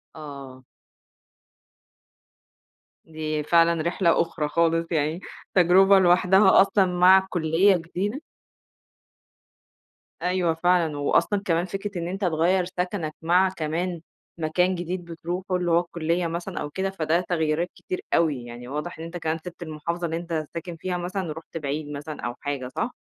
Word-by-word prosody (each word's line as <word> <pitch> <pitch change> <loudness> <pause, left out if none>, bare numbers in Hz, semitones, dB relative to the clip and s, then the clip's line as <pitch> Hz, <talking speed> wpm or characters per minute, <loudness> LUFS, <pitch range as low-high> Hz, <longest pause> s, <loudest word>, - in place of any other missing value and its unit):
آه. 140 -4 -10 2.4
دي 155 -1 -3
فعلًا 170 0 +3
رحلة 170 +1 +2
أُخرى 165 -2 -2
خالص، 165 +1 +2
يعني 155 +1 0 0.3
تجربة 190 +2 +6
لوحدها 190 +2 +5
أصلًا 195 0 +3
مع 185 +1 +5
كلِّية 175 +3 +3
جديدة 190 - -4 2.0
أيوه 180 -2 +1
فعلًا، 165 -2 +1
وأصلًا 195 +7 +1
كمان 170 0 +1
فكرة 195 +1 -5
إن 170 - -3
أنت 195 +3 -5
تغيّر 175 +1 +2
سكَنَك 180 -3 -3
مع 180 +3 +3
كمان 170 0 -3 0.4
مكان 180 +4 +1
جديد 175 +1 -4
بتروحه، 175 +3 -4
اللي 175 -1 0
هو 170 - +5
الكلِّية 170 0 -1
مثلًا 170 +3 -4
أو 145 - -4
كده، 190 +6 -2
فده 170 -2 0
تغييرات 170 -1 -1
كتير 370 0 -5
أوي، 145 -7 +1
يعني 120 +1 -9
واضح 150 +5 -5
إن - - -6
أنت 170 +1 -6
كمان 160 -1 -2
سيبت 175 0 -8
المحافظة 170 +2 -4
اللي 165 0 -2
أنت 165 -2 -3
ساكن 170 +1 -6
فيها 180 +2 -3
مثلًا، 180 +1 -3
ورُحت 160 +1 -7
بعيد 145 0 -4
مثلًا 145 +1 -7
أو 120 0 -4
حاجة 140 -3 -3
صح؟ 225 - -3
170 Hz, 145 wpm, -25 LUFS, 155-180 Hz, 2.4 s, تجربة